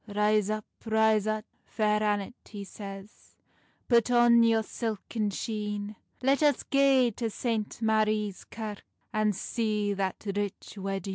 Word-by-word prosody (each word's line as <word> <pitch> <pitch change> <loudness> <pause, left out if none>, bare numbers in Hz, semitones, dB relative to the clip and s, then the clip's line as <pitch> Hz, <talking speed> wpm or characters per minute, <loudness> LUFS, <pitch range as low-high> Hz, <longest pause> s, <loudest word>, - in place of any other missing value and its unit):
"Rise 210 0 +2
up, 215 0 -2 0.2
rise 220 -1 +3
up, 215 0 -1 0.2
Fair 210 -1 +1
Annet," 205 0 0 0.2
he 205 -2 -7
says 195 0 -10 0.5
"Put 235 -1 +4
on 240 -1 +6
your 225 -1 +4
silken 220 -1 -3
sheene; 210 0 -4 0.3
Let 275 +3 +3
us 290 -3 +3
gae 270 -3 +4
to 230 -2 -1
St. 220 -1 -2
Marie's 215 -2 +1
Kirke, 215 -2 -6 0.3
And 215 -2 +2
see 210 0 -1
that 195 -1 -3
rich 205 -1 -3
weddeen." 195 -1 -4
215 Hz, 135 wpm, -29 LUFS, 205-225 Hz, 0.5 s, on